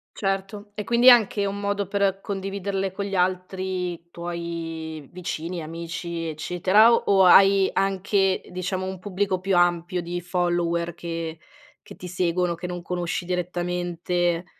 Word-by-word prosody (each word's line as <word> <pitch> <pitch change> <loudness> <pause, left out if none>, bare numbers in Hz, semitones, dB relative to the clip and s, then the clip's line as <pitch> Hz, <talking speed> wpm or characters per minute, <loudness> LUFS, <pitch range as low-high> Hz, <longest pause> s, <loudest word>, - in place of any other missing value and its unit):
Certo, 195 +1 -3
e 210 - -4
quindi 240 +4 +7
anche 215 -3 +4
un 200 0 -3
modo 200 0 -1
per 195 -1 0
condividerle 195 -1 -3
con 200 +2 -4
gli 200 - -6
altri 185 -1 -2
tuoi, 165 -3 -6
vicini, 170 -1 -5
amici, 170 +1 -5
eccetera 180 +8 +4
o 200 -4 +4
hai 195 +1 +6
anche, 195 0 +1
diciamo, 185 +1 -3
un 190 - -5
pubblico 190 0 -1
più 190 0 0
ampio 175 0 +2
di 175 +1 -4
follower 175 -1 0
che 165 -1 -5 0.5
che - - -10
ti 180 - -9
seguono 180 0 0
che 180 +1 -6
non 175 -1 -5
conosci 175 0 -3
direttamente? 175 -1 -1
180 Hz, 135 wpm, -24 LUFS, 170-195 Hz, 0.5 s, quindi